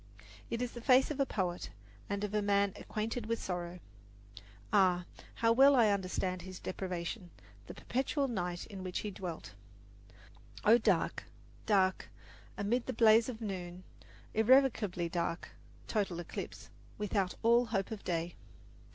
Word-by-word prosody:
It 235 +1 -1
is 245 - -3
the 240 - -8
face 260 +3 +5
of 295 - -5
a 275 - +2
poet, 180 -5 -2 0.4
and 200 0 -2
of 210 0 -3
a 210 - +2
man 200 -1 +2
acquainted 220 +1 -4
with 230 0 -1
sorrow. 175 -1 -4 0.9
Ah, 180 -2 +4 0.3
how 230 0 +3
well 270 +4 +7
I 230 -4 +5
understand 185 -2 -1
his 185 +1 -8
deprivation 180 +1 -4 0.4
the - - -8
perpetual 275 +2 -1
night 180 -7 -3
in 195 -3 -9
which 185 -1 -3
he 210 - -4
dwelt 180 -4 -7 1.1
O 230 +2 +7
dark, 200 -7 +1 0.4
dark, 190 -3 +2 0.5
amid 235 +5 0
the 260 - -2
blaze 225 +1 +5
of 235 -2 -6
noon, 185 -3 -5 0.5
Irrecoverably 220 -6 +3
dark, 170 0 -2 0.4
total 195 -6 -1
eclipse 175 - -7 0.3
Without 200 -3 -1
all 235 +1 +5
hope 195 -1 -1
of 215 -2 -6
day! 170 -1 -2
200 Hz, 145 wpm, -33 LUFS, 180-230 Hz, 1.1 s, well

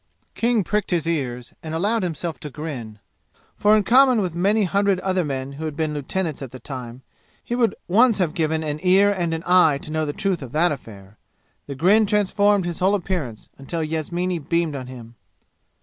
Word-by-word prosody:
King 230 -2 +1
pricked 210 +2 -1
his 170 -3 0
ears 125 -7 -3
and 160 0 -5
allowed 210 +7 +1
himself 165 -4 -4
to 150 - -7
grin, 130 -8 -7 0.6
for 210 +1 +4
in 210 - +2
common 255 +2 +5
with 185 -5 -1
many 200 +5 +2
hundred 200 0 +1
other 185 -1 0
men 135 -2 -4
who 150 +3 -6
had 155 -2 -4
been 155 -1 -1
lieutenants 155 +2 -3
at 135 - -6
the 130 - -9
time, 125 -1 -8 0.4
he - - -5
would 240 -2 +1
once 225 +4 +4
have 175 -5 0
given 160 -1 0
an 150 -1 -3
ear 190 +2 +4
and 175 -4 -1
an 165 0 -3
eye 175 -5 +5
to 150 - -8
know 155 0 0
the - - -1
truth 195 0 -1
of 130 -1 -9
that 165 +3 +3
affair. 105 -7 -9 0.5
The 140 - -5
grin 200 +9 +4
transformed 205 -1 +2
his 175 -1 -4
whole 190 +3 +3
appearance, 170 - -4
until 160 +4 -4
Yasmini 170 +3 -2
beamed 165 0 -1
on 130 -2 -6
him. 120 -3 -10
165 Hz, 195 wpm, -22 LUFS, 145-195 Hz, 0.6 s, common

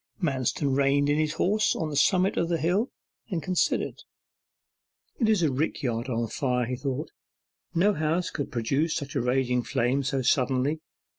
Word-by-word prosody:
Manston 135 - 0
reined 140 +1 +3
in 150 - +2
his 155 -1 +1
horse 210 +6 +2
on 155 -2 -2
the - - -4
summit 185 +6 +3
of 170 0 0
a 170 - +2
hill, 185 - +1 0.4
and 180 -5 -1
considered. 185 -2 0 1.2
'It 225 -4 +2
is 210 -5 +3
a 155 - +3
rick 150 +3 -2
yard 120 0 -2
on 115 -1 -1
fire,' 125 -1 0
he 125 +2 -3
thought; 130 0 -4 0.6
'no 200 +5 +4
house 160 +2 0
could 145 - -4
produce 135 +7 0
such 140 -3 -4
a 135 - +1
raging 125 0 +1
flame 125 +3 0
so 135 -1 -1
suddenly. 130 +4 +1
140 Hz, 170 wpm, -27 LUFS, 130-165 Hz, 1.2 s, no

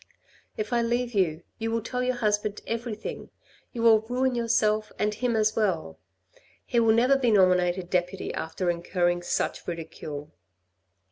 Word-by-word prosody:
If 215 +2 -3
I 240 - +3
leave 240 +1 -1
you 170 -5 +1 0.2
you 225 0 -2
will 225 -1 -1
tell 250 +2 -3
your 250 0 0
husband 210 -3 0
everything. 230 -2 -5 0.4
You 235 -2 -4
will 225 -2 +7
ruin 250 +4 0
yourself 215 -2 +1
and 210 0 0
him 240 +2 -1
as 215 0 +2
well. 170 - -1 0.7
He 235 - +1
will 225 -1 +4
never 250 +4 +4
be 250 -3 +2
nominated 185 -3 +3
deputy 180 +1 -1
after 175 +2 -1
incurring 175 0 0
such 175 - -2
ridicule. 155 -3 -6
215 Hz, 150 wpm, -27 LUFS, 180-235 Hz, 0.7 s, will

